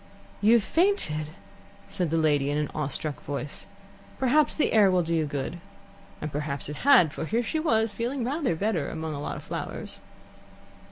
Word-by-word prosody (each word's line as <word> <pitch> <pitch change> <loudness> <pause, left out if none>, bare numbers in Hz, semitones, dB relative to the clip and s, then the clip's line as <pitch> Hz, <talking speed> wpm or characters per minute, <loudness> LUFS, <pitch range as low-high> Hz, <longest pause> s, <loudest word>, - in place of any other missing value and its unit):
"You 215 +3 +5
have 235 -3 +5
fainted," 320 - +1 0.6
said 180 -4 -2
the 165 - +1
lady 145 -3 +2
in 145 - 0
an 150 -1 -1
awe 150 -2 -1
struck 145 0 -4
voice. 145 +1 -5 0.5
"Perhaps 275 +4 +3
the 310 - +1
air 210 -3 +6
will 180 -1 +2
do 165 +1 -2
you 160 -2 +1
good." 145 +4 -4 0.6
And 150 - -4
perhaps 145 -1 -2
it 150 - -6
had, 180 - +5
for - - -4
here 230 +8 0
she 315 +7 -2
was, 225 -8 +1
feeling 240 +4 -2
rather 275 - 0
better 175 -5 -1
among 160 -1 -4
a 145 - -5
lot - - -4
of - - -9
flowers. - - -6
165 Hz, 185 wpm, -27 LUFS, 150-235 Hz, 0.6 s, air